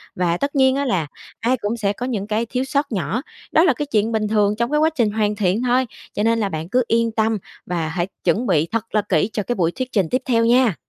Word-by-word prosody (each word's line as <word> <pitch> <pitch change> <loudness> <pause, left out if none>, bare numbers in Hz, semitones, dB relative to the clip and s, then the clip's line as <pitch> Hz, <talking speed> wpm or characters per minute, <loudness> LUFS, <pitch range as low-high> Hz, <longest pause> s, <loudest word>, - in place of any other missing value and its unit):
Và 175 -1 +1
tất 285 +6 -2
nhiên 265 -1 +4
á 280 0 0
là 180 - 0 0.3
ai 245 +4 +1
cũng 220 +1 -3
sẽ 205 -3 0
có 245 - -5
những 215 -6 -3
cái 220 +2 0
thiếu 250 +3 -2
sót 280 +1 -1
nhỏ, 215 +3 -1 0.3
đó 320 - +5
là 330 -7 +4
cái 295 +4 -3
chuyện 220 -3 0
bình 215 -1 0
thường 210 -1 +2
trong 235 +4 -1
cái 300 - +2
quá 315 +1 +4
trình 230 -7 +2
hoàn 210 -1 0
thiện 205 +2 +1
thôi. 255 +1 +2 0.3
Cho 210 - -1
nên 230 0 +2
là 205 -3 0
bạn 160 0 -5
cứ 250 +4 +2
yên 230 0 +2
tâm 220 0 +1 0.3
và 170 -3 -2
hãy 175 +2 -2 0.2
chuẩn 205 +8 +1
bị 165 -4 +2
thật 225 -1 -3
là 210 - +4
kỹ 180 +3 +2
cho 210 - -1
cái 245 - -2
buổi 170 -5 +1
thuyết 255 +5 -5
trình 190 -7 +1
tiếp 255 - 0
theo 230 -3 +2
nha. 240 -4 +4
220 Hz, 270 wpm, -21 LUFS, 200-250 Hz, 0.3 s, đó